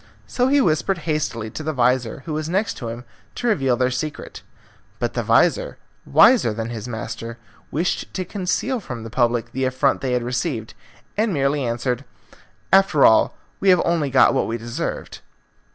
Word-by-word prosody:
So 250 0 0
he 285 +2 +4
whispered 175 - +1
hastily 130 -9 -2
to - - -6
the 155 0 -2
vizir, 125 0 +1
who 160 - -4
was 155 +1 -3
next 195 +5 0
to 120 - -6
him, 115 +1 -7 0.3
to - - -5
reveal 135 - +2
their 125 0 +1
secret. 150 +4 -5 0.6
But - - -2
the - - -1
vizir, - - +2 0.3
wiser 225 - +5
than 115 +1 -4
his 115 0 -6
master, 115 0 -6 0.3
wished 170 +5 -2
to 185 - -2
conceal 205 +7 -2
from 125 - -7
the 115 - -8
public 120 -1 0
the 130 +1 -1
affront 130 +2 +1
they 130 -2 -1
had 125 -1 0
received, 125 -2 -3 0.4
and 215 0 +1
merely 140 -2 0
answered, 120 +2 -2 0.7
"After 195 -7 +5
all, 110 - +4 0.2
we 195 - +2
have 180 -2 +5
only 165 -4 +1
got 130 0 +5
what 135 - 0
we 115 - -2
deserved." 120 +1 -5
135 Hz, 175 wpm, -22 LUFS, 120-170 Hz, 0.7 s, wiser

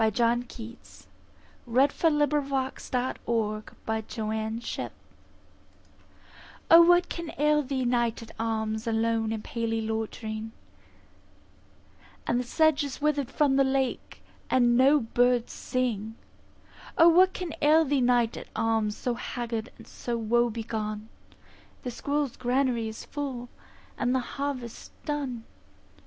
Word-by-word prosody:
John 235 +2 +2
Keats 235 -1 -11 0.6
La 250 +4 +5
Belle 295 +1 +2
Dame 290 0 -1 0.3
sans - - -11
Merci 220 -2 -3 1.8
O, 335 +1 +11
WHAT 350 +1 +5
can 340 -2 -5
ail 300 +1 +3
thee, 265 -2 -2
Knight 240 -2 0
at 225 - -12
arms, 220 0 -2
Alone 225 0 +1
and 220 -1 -3
palely 230 -1 -2
loitering; 220 0 -4 1.7
The 240 +1 +2
sedge 310 +4 +2
is 280 -3 -5
wither'd 290 -3 0
from 275 -2 +2
the 275 - +5
lake, 265 -1 -2 0.3
And 240 -2 +4
no 275 +4 +6
birds 245 +1 +1
sing. 225 -4 -2 0.8
O, 330 -2 +8
what 365 +3 +6
can 360 -3 -5
ail 310 +2 +5
thee, 280 -1 +1
Knight 245 -2 +3
at - - -8
arms, 225 -2 0
So 245 - -1
haggard 235 -1 -4
and - - -13
so 240 -1 -4
woe 235 +2 +2
begone? 215 -1 -4 0.7
The 250 - -3
squirrel's 285 +1 -2
granary 250 -2 +1
is 220 0 -7
full, 265 -5 -5 0.5
And 250 +1 +1
the - - +3
harvest's 255 -2 -5 0.2
done. 275 -6 -3
240 Hz, 120 wpm, -27 LUFS, 225-280 Hz, 1.8 s, O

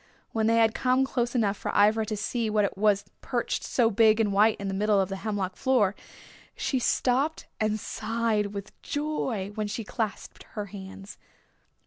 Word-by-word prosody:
When 220 -1 +1
they 230 - +4
had 225 -1 +4
come 255 +1 +2
close 245 -2 -1
enough 210 -4 +2
for - - -4
Ivra 215 +2 +4
to 215 - -2
see 225 +2 -1
what 210 -1 +2
it - - -3
was 200 0 +2 0.2
perched 240 -2 -2
so 230 -3 +2
big 220 +1 +5
and 210 -3 +2
white 210 +2 +4
in 200 - -4
the 195 - -2
middle 205 +1 +2
of 190 -1 +1
the 195 - -4
hemlock 195 -3 -3
floor 235 -7 +2 0.6
she 265 - -1
stopped 265 +5 +1
and 215 0 0
sighed 220 -1 -1
with 200 0 -7
joy 265 -9 -2
while 215 -1 -2
she 215 +2 -4
clasped 220 0 -4
her 210 -2 -3
hands. 195 0 -10
215 Hz, 180 wpm, -27 LUFS, 200-230 Hz, 0.6 s, big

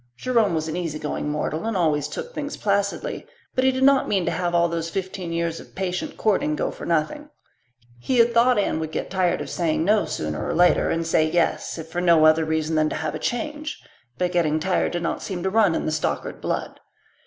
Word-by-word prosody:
Jerome 225 - +2
was 155 0 -1
an 160 - -3
easy 165 -4 -3
going 150 -1 -3
mortal 155 +6 -2
and 225 -3 -1
always 155 -4 +1
took 485 0 -6
things 290 -6 -4
placidly, 200 -1 -1 0.3
but 255 - +1
he 265 - +5
did 260 0 -1
not 275 0 +5
mean 190 -4 +1
to - - 0
have 175 -1 -1
all 170 0 +4
those 165 0 -3
fifteen 185 -1 -4
years 165 0 -1
of - - -15
patient 180 -2 -3
courting 190 -8 +1
go - - -1
for - - -8
nothing 170 - -1 0.7
He 250 - -1
had 235 0 +5
thought 240 +2 +4
Anne 200 -5 +1
would 160 -1 -4
get - - -4
tired 185 -2 +1
of - - -6
saying 165 -2 0
no, 210 +2 +3
sooner 75 0 -3
or - - -2
later, 175 -2 +4
and 165 0 -1
say 155 -1 +2
yes, 170 +1 0
if 160 - -6
for 175 +2 -2
no 170 -3 +5
other 155 0 +5
reason 160 0 -1
than 155 0 +2
to - - -4
have - - -3
a - - -4
change; 300 +4 -3 0.4
but 180 -1 0
getting 160 -3 +1
tired 185 +2 0
did 175 0 -2
not - - -2
seem 180 -3 -4
to 190 - 0
run 205 -5 +4
in - - -2
the - - 0
Stockard 155 0 -2
blood. - - -3
175 Hz, 230 wpm, -23 LUFS, 160-210 Hz, 0.7 s, he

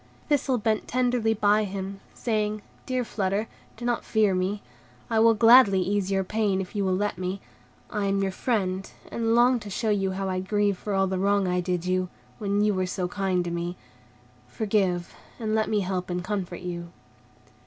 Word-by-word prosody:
Thistle 275 -3 +2
bent 215 -1 0
tenderly 245 -3 +1
beside 210 +1 +3
him, 195 0 -5 0.2
saying, 215 -2 -1 0.2
"Dear 255 -1 0
Flutter, 205 -1 -1 0.3
do 240 - -6
not 240 -1 0
fear 215 -3 +2
me. 185 +3 -1 0.5
I 225 - +3
will 225 0 +6
gladly 225 -3 +7
ease 195 +1 0
your 195 -1 +1
pain, 205 -1 0
if 190 +2 -6
you 200 - 0
will 185 -1 +1
let 205 -1 -1
me; 185 +2 -3 0.5
I 210 -1 -1
am 195 0 +1
your 190 - 0
friend, 190 -3 -1 0.2
and 230 0 +1
long 245 +1 +5
to 210 - -9
show 220 +3 -1
you 195 -2 0
how 195 0 -3
I 185 -1 -1
grieve 200 0 0
for 205 -2 -3
all 195 0 +3
the 190 -1 -2
wrong 200 0 +2
I 180 0 +1
did 180 -1 -2
you, 185 0 0 0.3
when 205 -1 +1
you 210 0 +3
were 185 -1 0
so 180 0 -2
kind 185 -1 -1
to 170 - -3
me. 170 +1 -3 0.7
Forgive, 195 -5 0 0.2
and 220 -2 -2
let 220 0 +1
me 210 -2 +2
help 185 -1 -3
and 180 0 -2
comfort 185 -3 -3
you." 170 -1 -5
200 Hz, 195 wpm, -26 LUFS, 185-215 Hz, 0.7 s, gladly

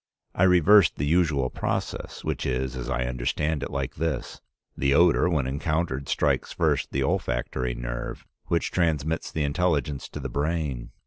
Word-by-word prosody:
I 95 - +3
reversed 90 +1 +6
the 70 - -2
usual 75 -5 +2
process, - - -3
which - - -2
is, 65 0 -1
as 65 0 -5
I 65 -1 0
understand 65 +5 -1
it, - - -3
like 70 -2 -4
this: 80 -4 -3 0.3
the 70 +1 +2
odor 85 +1 +5
when 75 -6 +1
encountered 70 0 -2
strikes - - +1
first - - 0
the 70 - 0
olfactory 65 -1 -1
nerve, - - -5 0.2
which 85 - 0
transmits 80 -2 0
the 80 - -1
intelligence 75 -2 0
to - - -7
the 65 - -4
brain. 70 -2 -2
70 Hz, 155 wpm, -26 LUFS, 65-80 Hz, 0.3 s, reversed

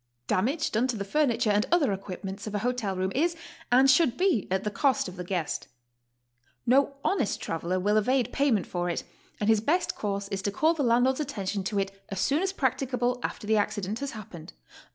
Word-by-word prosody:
Damage 265 - 0
done 230 +4 +2
to 245 -3 -2
the 200 - -2
furniture 240 -3 +2
and 205 +1 +2
other 305 - +3
equipments 195 +1 -6
of 210 - -4
a 205 +3 -2
hotel 245 -6 -1
room 185 +1 -1
is 335 +6 +1 0.4
and 260 +2 +6
should 265 -1 +4
be 360 - +2
at 190 +1 0
the 210 - -2
cost 265 +1 +1
of 185 - -8
the 180 - -5
guest. 175 -3 -3 1.0
No 275 +3 +3
honest 380 - +1
traveler 170 +3 -2
will 205 +3 +2
evade 250 +2 +1
payment 260 -9 +2
for 175 0 -2
it, 170 - -2 0.4
and 210 - -1
his 220 -1 +4
best 330 +10 +1
course 200 -1 -3
is 195 -1 -3
to 200 - -1
call 315 +10 +3
the 320 - -3
landlord's 250 +2 +3
attention 210 -9 -3
to 205 +1 -2
it 195 0 0 0.2
as 195 - -4
soon 285 - +2
as 385 0 0
practicable 250 -5 0
after 215 - -4
the 220 +1 +3
accident 205 +1 -1
has 280 -1 -4
happened. 185 -6 -10
220 Hz, 205 wpm, -28 LUFS, 195-270 Hz, 1.0 s, and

